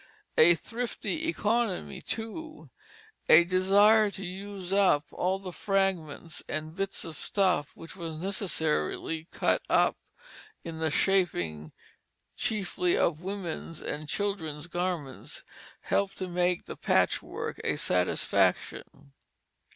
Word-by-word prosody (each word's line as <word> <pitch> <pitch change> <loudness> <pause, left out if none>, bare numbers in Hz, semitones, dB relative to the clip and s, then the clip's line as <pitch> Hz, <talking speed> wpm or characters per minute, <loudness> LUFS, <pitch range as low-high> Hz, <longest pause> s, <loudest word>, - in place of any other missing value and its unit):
A 170 +2 +8
thrifty 245 - -3
economy, 230 - 0
too, 310 +8 -6 0.6
a 170 - +9
desire 200 +4 +5
to 195 -1 -7
use 190 0 -6
up 190 -7 +4
all 185 +2 0
the 190 -2 -8
fragments 185 -6 -1
and 155 +1 -3
bits 195 0 -3
of 165 -2 -7
stuffs 180 -3 0
which 165 - -11
were 170 -3 -5
necessarily 160 - -2
cut - - +1
out - - +4 0.7
in 165 -2 -6
the 160 0 +1
shaping, 90 - +1 0.6
chiefly 190 -4 0
of 160 -1 +1
women's 180 -4 -5
and 150 0 -5
children's 160 -7 -2
garments, 175 -6 -4 0.4
helped 200 -1 0
to 185 - -3
make 180 0 0
the - - -7
patchwork - - 0
a - - +1
satisfaction. 90 -5 0
180 Hz, 110 wpm, -29 LUFS, 160-200 Hz, 0.7 s, a